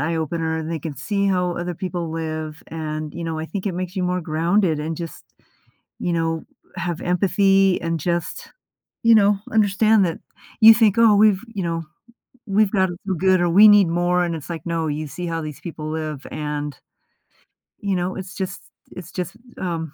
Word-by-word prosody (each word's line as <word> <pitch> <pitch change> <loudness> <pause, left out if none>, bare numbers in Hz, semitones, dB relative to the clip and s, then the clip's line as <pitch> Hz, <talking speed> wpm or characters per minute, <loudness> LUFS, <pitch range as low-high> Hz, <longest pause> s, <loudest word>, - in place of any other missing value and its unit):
eye-opener, 160 +1 -1
and 160 0 -4
they 165 - -2
can 150 0 -6
see 200 +6 -1
how 180 -2 0
other 175 0 -3
people 175 -2 -4
live, 155 -1 -5
and, 155 -1 -5
you 170 - -5
know, 160 -1 -3
I 160 - -4
think 200 +2 -5
it 190 - 0
makes 180 +1 -5
you 185 - 0
more 180 0 0
grounded 165 +1 +1
and 155 +2 -3
just, 170 -2 -7 0.8
you 175 - -1
know, 165 -1 -1 0.3
have 175 -2 -3
empathy 195 +1 +3
and 165 -1 -2
just, 170 +2 -3 0.5
you 230 - +6
know, 205 -1 +4
understand 215 0 +4
that 165 - -3 0.4
you 225 +1 +11
think, 215 -3 +3
"Oh, 225 -3 +6
we've 205 -2 +4
you 200 - -3
know, 165 -1 -2 0.6
we've 205 -1 +2
got 190 -3 +3
to 175 - -6
feel 190 -2 -1
good 185 +1 +3
or 175 - +2
we 205 +5 +8
need 205 -3 +7
more," 175 +1 +1
and 170 -1 -1
it's 155 +1 -8
like, 165 -1 -6
no, 165 -1 -1
you 150 +1 -3
see 175 +5 -6
how 165 -1 -2
these 150 -2 -7
people 155 -3 -6
live, 155 -3 -4
and 150 -2 -4 1.1
you 200 -2 0
know, 180 +1 -2
it's 190 -1 -7
just 190 0 -5 0.3
it's 180 -1 -10
just, 180 +3 -4 0.2
um, 165 -4 -3
175 Hz, 195 wpm, -22 LUFS, 160-195 Hz, 1.1 s, you